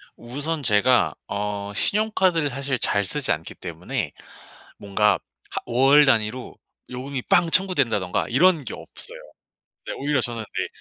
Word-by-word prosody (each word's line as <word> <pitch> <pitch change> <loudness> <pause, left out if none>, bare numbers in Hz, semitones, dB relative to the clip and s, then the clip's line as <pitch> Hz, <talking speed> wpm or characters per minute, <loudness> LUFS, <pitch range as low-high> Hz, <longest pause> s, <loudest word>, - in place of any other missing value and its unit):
우선 145 +6 -4
제가 120 +2 +3
어 100 0 -3
신용카드를 190 - +2
사실 135 0 -3
잘 100 -1 +1
쓰지 145 +7 -2
않기 80 0 -3
때문에 85 -1 -5 0.6
뭔가 105 +1 +2 0.4
하 - - -3
월 135 +5 +5
단위로 120 -1 0 0.3
요금이 130 +1 -5
빵 170 - +3
청구된다든가 135 - +2
이런 160 +2 +3
게 - - -5
없어요. 485 +3 -7 0.7
네 - - -3
오히려 145 -1 0
저는 120 -1 -2
이제 110 - -4
130 Hz, 285 characters per minute, -23 LUFS, 105-150 Hz, 0.7 s, 월